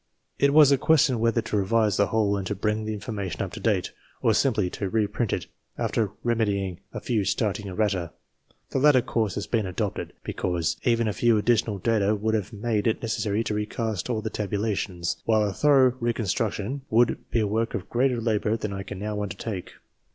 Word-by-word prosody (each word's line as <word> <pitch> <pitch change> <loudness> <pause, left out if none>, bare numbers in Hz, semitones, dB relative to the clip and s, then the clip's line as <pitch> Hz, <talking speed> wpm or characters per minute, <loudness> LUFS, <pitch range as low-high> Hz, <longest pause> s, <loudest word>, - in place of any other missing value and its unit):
It 140 - +4
was 150 -1 +7
a 140 - +4
question 145 -5 +3
whether 115 0 +2
to 110 -1 -2
revise 105 +1 +2
the 100 - +3
whole 105 -2 +1
and 95 -2 -3
to 105 - -2
bring 105 +2 -1
the 110 - -2
information 100 -4 -4
up - - -5
to - - -6
date, - - 0 0.3
or 115 - +4
simply 110 -5 +2
to 100 - -3
reprint 110 +2 0
it - - -2 0.3
after 110 -3 0
remedying 100 -6 0
a - - -5
few 115 -5 0
staring 100 +1 -1
errata. 95 -3 -1 0.6
The - - 0
latter 135 -3 +5
course 110 -5 -1
has 100 - -3
been 110 -5 0
adopted, 95 +2 -3
because 85 -1 -1
even 115 -2 +2
a 105 - 0
few 115 +4 +3
additional 110 -1 +1
data 105 +1 +1
would 110 +2 -1
have 105 -1 -1
made 110 0 -1
it 110 - 0
necessary 110 -1 0
to 110 - -2
recast 105 0 -2
all 110 -3 -1
the 110 - -3
tabulations, 100 -4 -2
while 110 -2 +3
a 100 - -3
thorough 135 -1 +4
reconstruction 115 +1 -1
would 120 +2 +3
be 115 - +1
a 110 - +2
work 110 +3 -1
of 95 +1 -4
greater 125 +1 +1
labour 110 -1 0
than 105 -2 -4
I 95 - -4
can 100 +1 -7
now 105 +1 -3
undertake. 100 -1 -5
110 Hz, 195 wpm, -26 LUFS, 100-115 Hz, 0.6 s, was